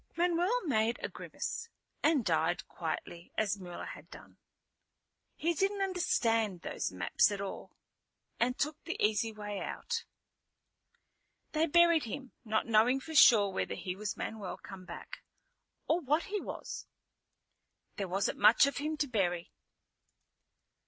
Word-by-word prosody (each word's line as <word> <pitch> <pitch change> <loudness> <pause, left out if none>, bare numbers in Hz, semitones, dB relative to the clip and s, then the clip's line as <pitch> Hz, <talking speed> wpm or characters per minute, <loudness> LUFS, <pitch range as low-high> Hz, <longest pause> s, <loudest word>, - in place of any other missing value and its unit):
Manuel 355 +6 +1
made 230 -4 +2
a - - -1
grimace, 460 0 -5 0.3
and 295 -8 +3
died 165 +1 +1
quietly 170 +1 -5
as 205 -2 +1
Mula 175 -2 -7
had - - -9
done. - - -13 1.0
He 340 +2 0
didn't 390 +3 +1
understand 230 - +1
those - - -3
maps 90 - +2
at 200 - -3
all, 200 -1 -6 0.7
and 250 +2 +1
took 300 +1 -2
the 340 - -4
easy 220 +2 +2
way 210 -2 -5
out. 470 -1 -3 1.5
They 315 +1 +2
buried 340 -1 +5
him, 260 +3 -6
not 220 -1 0
knowing 230 +4 +4
for 320 +4 -8
sure 220 -8 +7
whether - - -2
he 180 -1 -4
was 210 +1 -4
Manuel 210 -4 -5
come 190 -2 -10
back, - - -9 0.7
or 325 - +3
what 300 +1 +1
he 410 0 -3
was. - - -6 1.1
There 195 - -2
wasn't 190 +2 -1
much 220 +5 +7
of 280 - -2
him 305 +2 -2
to 295 - 0
bury. 180 -8 -1
230 Hz, 140 wpm, -32 LUFS, 200-320 Hz, 1.5 s, sure